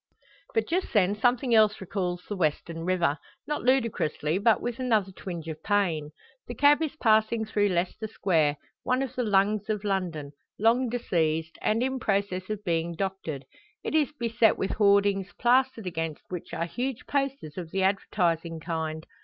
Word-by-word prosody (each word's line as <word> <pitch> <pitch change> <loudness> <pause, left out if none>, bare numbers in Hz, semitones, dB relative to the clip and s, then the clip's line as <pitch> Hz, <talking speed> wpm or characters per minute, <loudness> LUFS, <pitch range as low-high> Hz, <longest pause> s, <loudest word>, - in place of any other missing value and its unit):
But 450 - +1
just 365 +3 -1
then 200 -3 +4
something 245 +2 +2
else 215 -1 +5
recalls 180 -2 -3
the 205 - -3
western 165 -1 -1
river, 170 -6 +1 0.3
not 295 +1 -2
ludicrously, 225 - +1
but 220 +1 +4
with 240 0 -4
another 220 -7 +1
twinge 175 -3 -7
of 160 -1 -6
pain. 175 -8 0 0.4
The 240 - -6
cab 290 +5 +5
is 315 -1 -2
passing 220 -3 +2
through 205 -1 +1
Leicester 180 +4 -1
Square, 160 -8 +1 0.2
one 255 +1 +1
of 270 - -5
the 255 - -2
lungs 210 -1 +2
of 210 -1 -1
London, 175 -8 -2 0.3
long 235 +4 +3
diseased, 160 -9 -1
and 225 +3 +1
in 265 0 -1
process 195 -4 -1
of 210 -1 -4
being 170 -2 -1
doctored. 175 -7 -4 0.4
It - - -3
is 305 -3 +2
beset 230 -1 +3
with 195 - -1
hoardings, 200 -2 +3
plastered 250 -2 +2
against 165 -3 -4
which 180 -2 -6
are 170 - -2
huge 250 +7 -4
posters 275 - -2
of 175 -3 -6
the 190 +2 -1
advertising 170 -4 0
kind. 160 -1 -4
200 Hz, 165 wpm, -27 LUFS, 170-230 Hz, 0.4 s, else